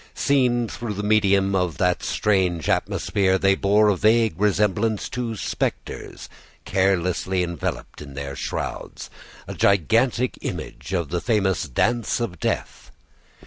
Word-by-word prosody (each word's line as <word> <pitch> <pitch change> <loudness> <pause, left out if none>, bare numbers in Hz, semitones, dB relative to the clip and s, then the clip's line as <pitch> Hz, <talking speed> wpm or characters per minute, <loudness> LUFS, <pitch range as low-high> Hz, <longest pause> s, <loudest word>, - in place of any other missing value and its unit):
Seen 125 -4 +2
through 110 -1 -5
the 105 - -4
medium 100 -2 +3
of 90 -4 0
that 90 -1 +1
strange 90 -6 0
atmosphere, 95 -2 +1
they 95 +1 +3
bore 105 +2 +3
a 100 - +3
vague 110 +3 +3
resemblance 105 +1 +1
to 120 -2 -3
spectres - - -4 0.4
carelessly 95 -1 +1
enveloped 85 -3 -5
in 70 -2 -10
their 70 -1 -5
shrouds, 65 - -5 0.4
a - - -5
gigantic 115 - +2
image 65 +3 -6
of 85 -6 -1
the 85 +2 -2
famous 100 -5 +1
Dance 120 - 0
of 100 -7 -4
Death. - - -3
100 Hz, 130 wpm, -23 LUFS, 90-110 Hz, 0.4 s, medium